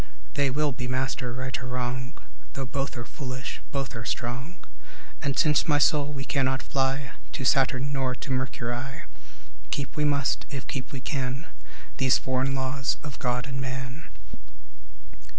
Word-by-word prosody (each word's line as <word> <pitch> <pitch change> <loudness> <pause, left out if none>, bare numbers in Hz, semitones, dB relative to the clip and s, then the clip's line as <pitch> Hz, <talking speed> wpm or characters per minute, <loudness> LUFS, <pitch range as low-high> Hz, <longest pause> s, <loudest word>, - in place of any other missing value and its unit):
They 140 -1 +3
will 150 +2 +2
be 125 -1 -3
master, 130 0 0
right 130 +1 -2
or 125 - -5
wrong; 125 0 -2 0.4
Though 135 - -2
both 135 0 -2
are 120 - -4
foolish, 130 -1 -4
both 135 -3 -1
are 115 - -3
strong. 125 +8 -2 0.7
And 140 -1 0
since, 150 +2 +5
my 150 -2 +5
soul, 145 0 +4
we 135 -2 -3
cannot 130 -2 +2
fly 135 0 +1 0.2
To 135 - -2
Saturn 135 +1 +4
nor 130 -2 +1
to 135 - -5
Mercury, 130 0 -1 0.7
Keep 140 -1 -2
we 150 - +1
must, 140 -3 +2
if 135 -2 -4
keep 130 -2 -4
we 135 - -4
can, 135 +1 -1 0.5
These 130 -1 +5
foreign 130 +1 +1
laws 130 0 0
of 145 -3 -6
God 125 -1 +1
and 135 -1 -3
man. 130 +2 -4
130 Hz, 155 wpm, -28 LUFS, 130-140 Hz, 0.7 s, since